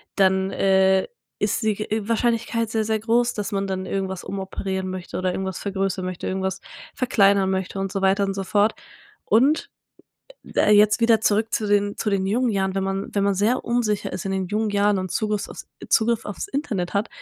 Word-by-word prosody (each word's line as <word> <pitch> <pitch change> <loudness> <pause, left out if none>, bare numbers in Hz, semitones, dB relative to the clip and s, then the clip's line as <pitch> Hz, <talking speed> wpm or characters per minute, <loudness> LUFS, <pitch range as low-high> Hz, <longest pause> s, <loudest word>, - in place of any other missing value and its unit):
dann, 190 -1 +2
äh, 190 0 +3 0.3
ist - - 0
die, 220 - +3
äh, 215 +1 -1
g 205 - -10
Wahrscheinlichkeit 230 -1 0
sehr, 220 -1 0
sehr 220 0 0
groß, 235 +2 +1
dass 210 +1 -4
man 195 -1 -1
dann 190 0 -3
irgendwas 190 -1 -3
umoperieren 190 -1 -4
möchte 185 -1 -6
oder 185 0 0
irgendwas 190 -1 -4
vergrößern 195 -2 -2
möchte, 185 -1 -4
irgendwas 190 0 -2 0.3
verkleinern 200 -6 +3
möchte 190 +1 -2
und 195 -1 -2
so 195 - -2
weiter 195 +1 +3
und 195 - -2
so 195 - -3
fort. 205 +3 +2 0.5
Und, 275 +8 +3 0.9
äh, 210 - +4
jetzt 210 +2 +5
wieder 230 -1 +4
zurück 220 +1 +1
zu 215 - 0
den 205 0 +1
zu 210 - -1
den 190 -1 0
jungen 240 +5 +1
Jahren. 190 -2 -1
Wenn 195 0 -1
man 195 +1 -3
wenn 200 -1 +2
man 200 -1 +2
sehr 215 +6 +1
unsicher 235 -4 0
ist 185 - -5
in 195 - -2
den 190 -1 -1
jungen 215 +2 -1
Jahren 205 -1 +2
und 185 -1 -4
Zugriffs 210 -2 -1
auf - - -10 0.3
Zugriff 230 0 +2
auf's 205 - -5
Internet 215 - -3
hat, 205 +3 0
200 Hz, 200 wpm, -23 LUFS, 190-220 Hz, 0.9 s, jetzt